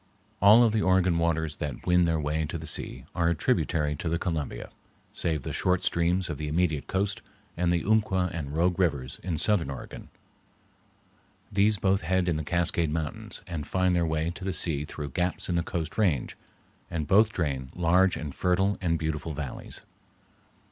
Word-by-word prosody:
All 105 +4 +8
of 115 -2 +3
the 110 - +2
Oregon 95 -3 +3
waters 80 -2 0
that 75 -6 -5
win 90 0 +4
their 80 -1 +1
way 75 +1 -1
to 80 - -4
the 80 - -8
sea 65 -5 -2
are 85 -2 +1
a 85 - +1
tributary 75 0 0
to 85 - -3
the 85 - +1
Columbia, 80 -8 -4 0.4
save 80 -5 0
the - - -4
short 90 -1 +1
streams 85 +2 +1
of 75 -3 -5
the 75 - -3
immediate 80 -2 0
coast, 100 +1 -1 0.3
and 85 0 +1
the 85 -2 +1
Umpqua 95 -4 +2
and 75 -3 -5
Rogue 90 +2 +2
Rivers 70 -8 0
in 85 -3 -2
southern 90 -3 +2
Oregon. 65 -2 -8 1.4
These 105 +2 +3
both 95 +1 +1
head 95 +2 0
in 85 - +1
the 80 - -2
Cascade 85 0 0
Mountains 95 +9 -4
and 85 -5 -5
find 95 -1 +1
their 85 - +2
way 80 +1 -1
to 90 - -9
the 95 0 -2
sea 75 -5 +1
through 75 -2 -6
gaps 90 +7 -2
in 90 - 0
the 85 - +2
Coast 85 -2 -4
Range, 85 - +1 0.5
and 80 -3 -2
both 105 +7 +4
drain 70 -8 -2
large 90 +2 +3
and 75 -4 -5
fertile 95 +3 +1
and 85 -2 +1
beautiful 80 -1 -3
valleys. 70 -4 -6
85 Hz, 185 wpm, -27 LUFS, 75-95 Hz, 1.4 s, All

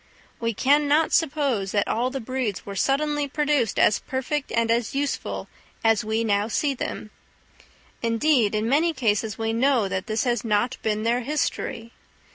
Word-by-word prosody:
We 230 -2 -1
can 290 +5 +3
not 305 +3 +2
suppose 275 - +1
that 205 -1 +1
all 240 +3 0
the 270 +1 -4
breeds 250 -4 -3
were 200 - -6
suddenly 290 +6 +1
produced 290 -5 0
as 210 - +4
perfect 270 +2 -3
and 230 0 +1
as 235 +2 0
useful 280 0 -2 0.4
as 225 -2 +3
we 220 +1 -1
now 205 -1 +1
see 280 +5 0
them; 215 -4 -5 0.9
indeed, 230 -1 +2
in 215 +1 0
many 315 +6 +2
cases, 220 -5 0
we 225 0 -1
know 245 -2 +2
that 190 0 -3
this 215 0 0
has 240 -1 0
not 235 +3 0
been 215 -1 -1
their 235 +2 +2
history. 240 -4 -3
235 Hz, 165 wpm, -24 LUFS, 220-280 Hz, 0.9 s, as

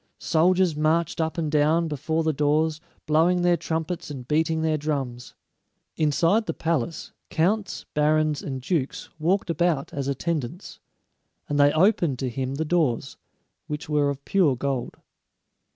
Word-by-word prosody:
Soldiers 180 0 +2
marched 160 +2 +1
up 160 +2 -2
and 155 -3 -1
down 155 +2 +3
before 160 +2 -1
the 160 0 +1
doors, 150 +2 +1 0.2
blowing 165 +3 +3
their 175 0 +4
trumpets 165 0 -3
and 130 -4 -7
beating 160 +2 +1
their 160 -1 +2
drums. 135 -5 -4 0.6
Inside 165 +8 +2
the - - -2
palace, 165 -1 -2 0.2
counts, 195 +5 0
barons, 150 0 +2
and 130 -3 -5
dukes 145 -4 -2
walked 180 +3 +1
about 165 -4 0
as 140 -1 -3
attendants, 155 +3 -3 0.7
and 145 0 -1
they 145 0 +6
opened 170 - +3
to 130 0 -2
him 130 +2 -3
the 160 +3 -2
doors, 150 -6 0 0.5
which 150 -2 -5
were 145 -1 +2
of 140 0 -5
pure 175 -9 +3
gold. 130 -1 -3
155 Hz, 145 wpm, -25 LUFS, 145-170 Hz, 0.7 s, they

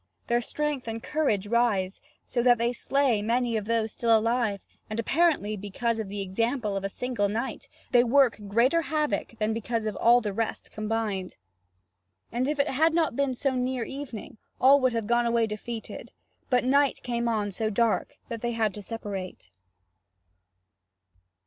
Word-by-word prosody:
Their 240 0 +1
strength 295 0 -3
and 225 0 -4
courage 285 -11 0
rise, 205 -4 +1 0.2
so 240 - -1
that 245 0 +5
they 235 +1 0
slay 260 -3 +1
many 235 +2 0
of 215 -2 -1
those 225 -1 0
still 230 0 +3
alive, 225 -2 0 0.3
and 215 +1 -3
apparently 275 -5 +2
because 215 +3 -2
of 215 -3 -4
the 205 0 -4
example 215 +3 -1
of 195 - -2
a 195 - -1
single 230 -2 -1
knight 230 +6 -4 0.2
they 240 -1 +6
work 255 -1 +3
greater 245 +11 +3
havoc 305 -7 -1
than 215 0 0
because 225 0 -2
of 215 - -2
all 240 +1 +6
the 210 -4 -3
rest 225 +2 -3
combined. 215 -3 -2 1.0
And 245 +3 0
if 295 0 -1
it 280 +1 +2
had 320 +4 +2
not 320 -7 +1
been 275 -1 0
so 270 +2 0
near 250 -1 -1
evening, 250 -5 -7 0.2
all 275 +2 +7
would 255 -2 +2
have 230 -2 -1
gone 240 +2 +2
away 235 -1 +2
defeated; 220 +1 -7 0.4
but 250 -2 +3
night 280 +2 +2
came 235 -1 -1
on 210 -3 0
so 220 +3 -1
dark 230 +6 0
that 230 -2 -5
they 240 0 -1
had 220 -3 0
to 210 - -7
separate. 195 - -6
230 Hz, 170 wpm, -27 LUFS, 215-255 Hz, 1.0 s, all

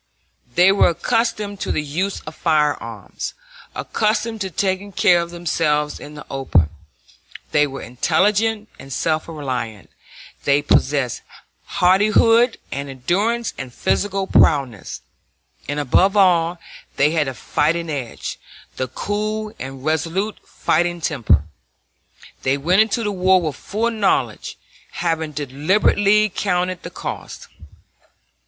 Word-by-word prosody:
They 180 +2 +6
were 200 - +4
accustomed 210 +2 -1
to - - -2
the 150 - 0
use 180 +7 -2
of 155 - -9
firearms, 150 -3 -1 0.4
accustomed 220 0 -1
to 190 - -2
taking 190 +2 -1
care 175 -2 +4
of 170 - -5
themselves 155 -3 -1
in 150 - -10
the 150 - -9
open; 95 - +1 0.8
they 150 0 +3
were 135 0 -7
intelligent 205 - +1
and 135 - -11
self 155 +3 -1
reliant; 125 - -5 0.5
they 145 0 +3
possessed 140 -3 +1 0.4
hardihood 215 +6 +4
and 140 0 -4
endurance 200 - -1
and 130 -2 -6
physical 195 +8 0
prowess; 135 - +2 0.7
and, 145 +1 -1
above 185 +9 +3
all, 175 -3 +3 0.4
they 145 +2 +3
had 155 -3 +1
the 135 - -4
fighting 165 +7 0
edge, 135 -7 -5 0.4
the 130 - -1
cool 215 - -3
and 135 +1 -7
resolute 165 +7 -1
fighting 175 +2 0
temper. 120 - +2 1.0
They 135 +1 +1
went 180 +8 +3
into 225 +1 +1
the 210 - -1
war 185 -1 +4
with 155 -5 -3
full 225 +8 -2
knowledge, 215 -4 0 0.4
having 160 -2 -1
deliberately 190 +9 +2
counted 180 -2 -1
the - - -7
cost. - - -7
170 Hz, 120 wpm, -20 LUFS, 145-200 Hz, 1.0 s, They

